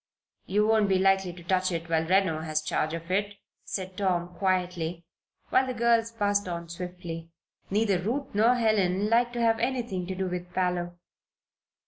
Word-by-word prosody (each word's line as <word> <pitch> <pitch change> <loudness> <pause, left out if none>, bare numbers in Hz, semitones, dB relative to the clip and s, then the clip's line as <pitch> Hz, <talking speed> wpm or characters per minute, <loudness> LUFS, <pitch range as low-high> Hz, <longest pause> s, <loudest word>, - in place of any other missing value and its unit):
"You 210 +3 +2
won't 215 -2 +3
be 190 - +4
likely 190 -1 +3
to 175 0 -12
touch 185 +1 +1
it 165 -1 -3
while 160 -1 +1
Reno 185 -4 +2
has 155 -1 -1
charge 155 +1 -1
of 165 +2 -7
it," 205 +2 0 0.3
said 185 -1 -5
Tom, 180 -3 0
quietly, 180 -3 -1 0.4
while 260 - +3
the 255 - -3
girls 230 -1 +2
passed 205 -3 0
on 170 -1 -5
swiftly. 170 -1 -6 0.4
Neither 205 -2 +2
Ruth 250 +9 -3
nor 225 +4 +4
Helen 210 -3 +2
liked 240 +1 +3
to 240 - -2
have 225 -1 +3
anything 235 -7 -2
to 190 - -3
do 190 +1 -2
with 180 0 -5
Parloe. 175 -1 -1
185 Hz, 170 wpm, -28 LUFS, 175-215 Hz, 0.4 s, be